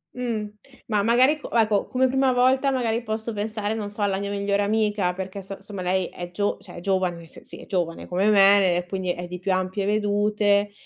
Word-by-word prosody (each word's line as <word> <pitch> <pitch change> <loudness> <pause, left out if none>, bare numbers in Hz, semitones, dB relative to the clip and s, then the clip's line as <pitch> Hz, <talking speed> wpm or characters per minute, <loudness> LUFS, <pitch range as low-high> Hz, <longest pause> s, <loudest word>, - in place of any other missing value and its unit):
Mhmm, 230 -4 -3 0.4
ma, 210 -3 +1
magari, 255 +7 +4
co - - -10
ecco, 215 -3 +2
come 260 +1 +2
prima 265 0 +2
volta, 260 +2 +3
magari, 235 -3 -1
posso 220 +1 -4
pensare, 215 0 -3
non 210 -2 -4
so, 205 +1 -8
alla 195 -1 +1
mia 200 0 -3
migliore 200 0 0
amica, 210 -3 +1
perché 190 +2 -6
so 195 +1 -7
insomma, 195 -1 -8
lei 185 +1 0
è 175 0 -8
gio 205 +3 -1
cioè, 180 - -13
è - - -5
giovane, 180 -3 -1
se - - -14
sì, - - -10
è - - -11
giovane 175 -4 -3
come 190 +4 +1
me 195 -3 +5
e, 175 - -2
quindi, 185 -1 -2
è 175 0 -5
di 180 +1 -6
più 190 +1 -1
ampie 185 +2 -1
vedute. 205 0 +1
205 Hz, 215 wpm, -24 LUFS, 190-220 Hz, 0.4 s, me